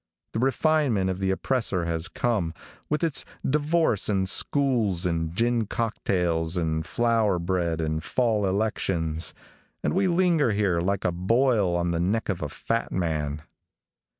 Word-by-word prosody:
The -, -, -1 dB
refinement 135 Hz, -7 st, +2 dB
of 95 Hz, -, -5 dB
the 95 Hz, -1 st, 0 dB
oppressor 95 Hz, -3 st, 0 dB
has 85 Hz, 0 st, -2 dB
come, 95 Hz, -10 st, -1 dB, 0.3 s
with 150 Hz, +2 st, 0 dB
its 160 Hz, -5 st, +2 dB, 0.2 s
divorce 150 Hz, -, +1 dB
and 95 Hz, -2 st, +1 dB
schools 110 Hz, -6 st, +1 dB
and 80 Hz, -2 st, 0 dB
gin 115 Hz, +3 st, 0 dB
cocktails 90 Hz, -7 st, -1 dB
and 80 Hz, -2 st, 0 dB
flour 110 Hz, 0 st, +1 dB
bread 85 Hz, -2 st, -1 dB
and 80 Hz, 0 st, -2 dB
fall 110 Hz, -5 st, +1 dB
elections, 95 Hz, -5 st, -1 dB, 0.5 s
and -, -, 0 dB
we 190 Hz, +2 st, +2 dB
linger 170 Hz, -, +2 dB
here 95 Hz, -5 st, +1 dB
like 95 Hz, +2 st, -1 dB
a 90 Hz, -, +2 dB
boil 105 Hz, +1 st, +2 dB
on 85 Hz, 0 st, 0 dB
the 85 Hz, -, -1 dB
neck 100 Hz, +7 st, 0 dB
of 95 Hz, -, -2 dB
a 75 Hz, -, -3 dB
fat 115 Hz, +10 st, -2 dB
man. 75 Hz, -4 st, -2 dB
95 Hz, 150 wpm, -26 LUFS, 85-120 Hz, 0.5 s, refinement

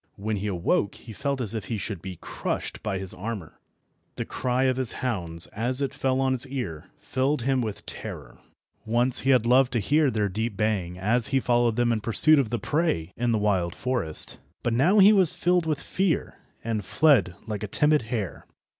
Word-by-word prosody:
When 105 Hz, +1 st, -3 dB
he 100 Hz, +2 st, -3 dB
awoke 95 Hz, +1 st, 0 dB
he 115 Hz, -, -11 dB
felt 140 Hz, +2 st, -2 dB
as 110 Hz, -3 st, -3 dB
if 110 Hz, -4 st, -4 dB
he 115 Hz, -, -3 dB
should 100 Hz, -3 st, -5 dB
be 95 Hz, 0 st, -7 dB
crushed -, -, -4 dB
by 105 Hz, -3 st, -2 dB
his 95 Hz, -1 st, -6 dB
armour. 100 Hz, -3 st, -7 dB, 0.6 s
The -, -, -4 dB
cry 130 Hz, 0 st, -1 dB
of 130 Hz, -1 st, +1 dB
his 130 Hz, -3 st, +3 dB
hounds, 90 Hz, -10 st, -1 dB
as 125 Hz, +5 st, -1 dB
it 140 Hz, -2 st, -2 dB
fell 130 Hz, 0 st, 0 dB
on 135 Hz, 0 st, +1 dB
his 130 Hz, +1 st, -1 dB
ear, 95 Hz, -, -5 dB
filled 130 Hz, 0 st, -1 dB
him 130 Hz, 0 st, +1 dB
with 110 Hz, -4 st, -5 dB
terror. -, -, -6 dB, 0.4 s
Once 120 Hz, +3 st, +3 dB
he 135 Hz, -, -1 dB
had 125 Hz, -4 st, +4 dB
loved 125 Hz, +2 st, +4 dB
to 120 Hz, -, +1 dB
hear 145 Hz, +8 st, +2 dB
their 105 Hz, -4 st, 0 dB
deep 105 Hz, +2 st, -3 dB
baying 100 Hz, -5 st, -1 dB
as 115 Hz, +6 st, +2 dB
he 135 Hz, 0 st, +1 dB
followed 120 Hz, -2 st, +1 dB
them 120 Hz, 0 st, +1 dB
in 110 Hz, -2 st, -1 dB
pursuit 150 Hz, +8 st, +6 dB
of 130 Hz, -6 st, 0 dB
the 120 Hz, -, -1 dB
prey 130 Hz, -, -1 dB
in 120 Hz, 0 st, 0 dB
the 110 Hz, -, +2 dB
wild 95 Hz, -5 st, 0 dB
forest, 120 Hz, -12 st, 0 dB, 0.2 s
but 120 Hz, -, 0 dB
now 165 Hz, -, +3 dB
he 205 Hz, +1 st, +8 dB
was 185 Hz, -5 st, +3 dB
filled 175 Hz, -1 st, +1 dB
with 155 Hz, -3 st, -1 dB
fear, 185 Hz, 0 st, -1 dB, 0.3 s
and 110 Hz, -2 st, -2 dB
fled 100 Hz, -, +3 dB
like 105 Hz, -2 st, -5 dB
a 105 Hz, -, -3 dB
timid 150 Hz, +8 st, +3 dB
hare. 110 Hz, -5 st, -5 dB
120 Hz, 205 wpm, -25 LUFS, 105-135 Hz, 0.6 s, he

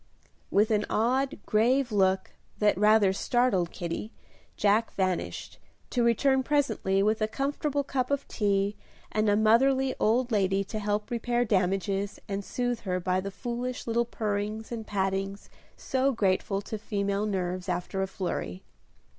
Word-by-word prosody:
With 210 Hz, +3 st, +3 dB
an 210 Hz, -1 st, +2 dB
odd, 260 Hz, +6 st, +1 dB
grave 245 Hz, +4 st, +2 dB
look, 190 Hz, -2 st, +2 dB, 0.3 s
that 210 Hz, -1 st, +3 dB
rather 210 Hz, 0 st, +4 dB
startled 230 Hz, -5 st, +1 dB
Kitty, 175 Hz, +6 st, -5 dB, 0.5 s
Jack 210 Hz, +2 st, +2 dB
vanished, 185 Hz, -2 st, -2 dB, 0.3 s
to 245 Hz, -, +1 dB
return 265 Hz, +3 st, +3 dB
presently 260 Hz, -9 st, +1 dB
with 215 Hz, +1 st, +1 dB
a 215 Hz, -, +2 dB
comfortable 285 Hz, +3 st, -1 dB
cup 255 Hz, -2 st, -1 dB
of 280 Hz, 0 st, -1 dB
tea 200 Hz, -1 st, 0 dB, 0.4 s
and 215 Hz, 0 st, +1 dB
a 205 Hz, -, +4 dB
motherly 260 Hz, +5 st, +4 dB
old 240 Hz, +3 st, +2 dB
lady 195 Hz, -2 st, +2 dB
to 215 Hz, +2 st, -5 dB
help 210 Hz, +1 st, -2 dB
repair 240 Hz, +1 st, 0 dB
damages 195 Hz, 0 st, 0 dB
and 200 Hz, 0 st, -3 dB
soothe 245 Hz, +2 st, -2 dB
her 185 Hz, -3 st, -2 dB
by 185 Hz, +1 st, 0 dB
the 195 Hz, -, -4 dB
foolish 245 Hz, +4 st, -4 dB
little 235 Hz, +1 st, +1 dB
purrings 215 Hz, 0 st, -3 dB
and 225 Hz, -2 st, -5 dB
pattings 195 Hz, 0 st, -2 dB, 0.3 s
so 265 Hz, +1 st, +1 dB
grateful 195 Hz, -2 st, 0 dB
to 220 Hz, +1 st, -5 dB
female 200 Hz, -1 st, -1 dB
nerves 185 Hz, -2 st, -2 dB
after 180 Hz, +2 st, -2 dB
a 190 Hz, -, 0 dB
flurry. 180 Hz, -, -4 dB
210 Hz, 145 wpm, -28 LUFS, 195-240 Hz, 0.5 s, rather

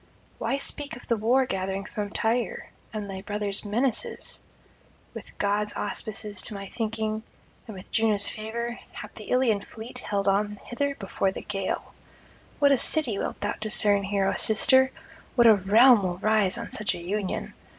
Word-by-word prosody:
Why 275 Hz, -, 0 dB
speak 285 Hz, 0 st, -4 dB
of 245 Hz, -, -12 dB
the 230 Hz, -, +1 dB
war 240 Hz, +5 st, +2 dB
gathering 195 Hz, -2 st, -3 dB
from 210 Hz, -1 st, -4 dB
Tyre, 230 Hz, +3 st, -1 dB, 0.2 s
and 210 Hz, -2 st, -5 dB
thy 190 Hz, -1 st, -6 dB
brother's 205 Hz, 0 st, -3 dB
menaces?... 225 Hz, +4 st, -2 dB, 0.7 s
With -, -, -10 dB
gods' 205 Hz, +1 st, 0 dB
auspices 210 Hz, -1 st, -2 dB
to 215 Hz, -, -3 dB
my 195 Hz, 0 st, -6 dB
thinking, 220 Hz, -1 st, -2 dB, 0.5 s
and 215 Hz, -4 st, -8 dB
with 185 Hz, -, -12 dB
Juno's 215 Hz, -3 st, +2 dB
favour, 235 Hz, +2 st, -5 dB
hath -, -, -9 dB
the -, -, -10 dB
Ilian 245 Hz, -5 st, +2 dB
fleet 230 Hz, +4 st, -9 dB
held 200 Hz, -4 st, -2 dB
on 205 Hz, +1 st, +1 dB
hither 280 Hz, +3 st, -2 dB
before 195 Hz, -2 st, -1 dB
the -, -, -7 dB
gale. 195 Hz, -2 st, -4 dB, 0.6 s
What 285 Hz, -1 st, +4 dB
a 275 Hz, -, +4 dB
city 250 Hz, -11 st, +4 dB
wilt -, -, -4 dB
thou 205 Hz, -, -1 dB
discern 210 Hz, -1 st, +3 dB
here, 195 Hz, 0 st, 0 dB
O -, -, +1 dB
sister! 260 Hz, +4 st, +5 dB, 0.5 s
what 240 Hz, -2 st, +5 dB
a 225 Hz, -, +9 dB
realm 215 Hz, +4 st, +6 dB
will 180 Hz, -2 st, -2 dB
rise 215 Hz, 0 st, +2 dB
on 230 Hz, -, -6 dB
such 215 Hz, -, 0 dB
a -, -, -7 dB
union! 190 Hz, +3 st, -3 dB
215 Hz, 170 wpm, -26 LUFS, 200-235 Hz, 0.7 s, a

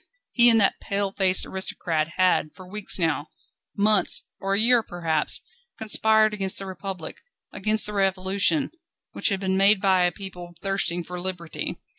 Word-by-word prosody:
He 240 Hz, -1 st, +5 dB
and 225 Hz, -1 st, +5 dB
that 195 Hz, -, +2 dB
pale 200 Hz, -1 st, -2 dB
face 190 Hz, -2 st, +1 dB
aristocrat 170 Hz, -4 st, -3 dB
had 180 Hz, -4 st, +1 dB
for 185 Hz, -1 st, -13 dB
weeks 210 Hz, +1 st, -1 dB
now, 160 Hz, -4 st, -1 dB, 0.5 s
months, 210 Hz, 0 st, +3 dB
or 195 Hz, 0 st, -1 dB
years 230 Hz, +2 st, +3 dB
perhaps, 165 Hz, -3 st, -1 dB, 0.4 s
conspired 220 Hz, 0 st, +3 dB
against 195 Hz, -2 st, -1 dB
the 195 Hz, -, -1 dB
Republic, 190 Hz, -3 st, -7 dB, 0.3 s
against 215 Hz, 0 st, +2 dB
the 210 Hz, -, -3 dB
Revolution, 195 Hz, +8 st, +1 dB, 0.4 s
which -, -, -1 dB
had 195 Hz, -2 st, -1 dB
been 190 Hz, -1 st, -1 dB
made 200 Hz, +1 st, +4 dB
by 190 Hz, -2 st, +2 dB
a 175 Hz, -, +1 dB
people 175 Hz, -2 st, -9 dB
thirsting 195 Hz, -3 st, -1 dB
for 180 Hz, +2 st, -7 dB
liberty. 175 Hz, -2 st, -5 dB
195 Hz, 155 wpm, -24 LUFS, 180-205 Hz, 0.5 s, He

